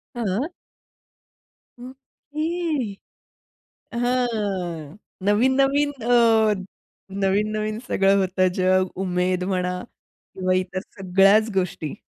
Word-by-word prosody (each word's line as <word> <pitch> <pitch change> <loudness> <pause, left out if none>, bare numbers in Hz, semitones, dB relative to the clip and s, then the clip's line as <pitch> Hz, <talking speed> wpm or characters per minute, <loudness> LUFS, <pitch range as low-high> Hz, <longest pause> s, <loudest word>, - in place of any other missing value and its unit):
हां. 235 - -2 1.3
ओके. 290 - -4 1.1
हां. 205 - -2 0.3
नवीन-नवीन 270 +7 +3
अ, 225 -2 +4 0.7
नवीन-नवीन 215 +2 0
सगळं 195 0 +3
होतं 185 0 +2
जग, 185 0 +3 0.2
उमेद 180 0 0
म्हणा 180 0 -1 0.5
किंवा 185 -1 0
इतर 185 0 -2 0.2
सगळ्याच 195 +3 +4
गोष्टी. 180 -5 -2
205 Hz, 75 wpm, -23 LUFS, 185-245 Hz, 1.3 s, अ